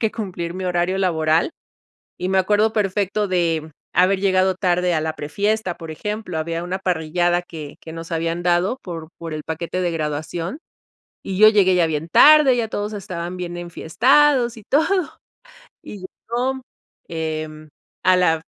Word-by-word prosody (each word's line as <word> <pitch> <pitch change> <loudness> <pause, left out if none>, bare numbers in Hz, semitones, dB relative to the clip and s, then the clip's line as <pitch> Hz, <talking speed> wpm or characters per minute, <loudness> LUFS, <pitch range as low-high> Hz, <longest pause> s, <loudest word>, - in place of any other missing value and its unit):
que 220 -2 +1
cumplir 180 -6 -5
mi 185 - -5
horario 180 +1 0
laboral, 160 - +1 0.7
y 180 +1 -3
me 190 - +2
acuerdo 210 +3 +2
perfecto 205 0 0
de 165 -3 0 0.2
haber 190 +1 +3
llegado 190 -1 +2
tarde 180 -1 +1
a 155 - +1
la 160 0 -3
pre-fiesta, 200 +5 -1
por 165 - -9
ejemplo, 210 0 -4
había 165 +1 -3
una 185 +2 -3
parrillada 175 0 0
que 155 -4 -9
que 160 - -9
nos 165 +1 -8
habían 165 +1 -2
dado 180 +7 +1
por 165 -3 -7
por 165 -1 -6
el 155 0 -5
paquete 170 +3 -4
de 175 -1 0
graduación 160 - -3 0.7
y 190 -1 -4
yo 215 - +9
llegué 195 -4 +4
ya 170 -2 +3
bien 160 +1 -3
tarde, 300 - +7
ya 230 -2 0
todos 210 0 -3
estaban 180 -2 -5
bien 175 -1 -5
enfiestados 240 - +2
y 220 - -11
todo. 325 - +1 0.7
Y 205 - -9
yo, 245 +7 -4 0.5
em, 155 -1 -5 0.4
a 185 - +6
la 165 -3 +2
180 Hz, 160 wpm, -21 LUFS, 165-205 Hz, 0.7 s, yo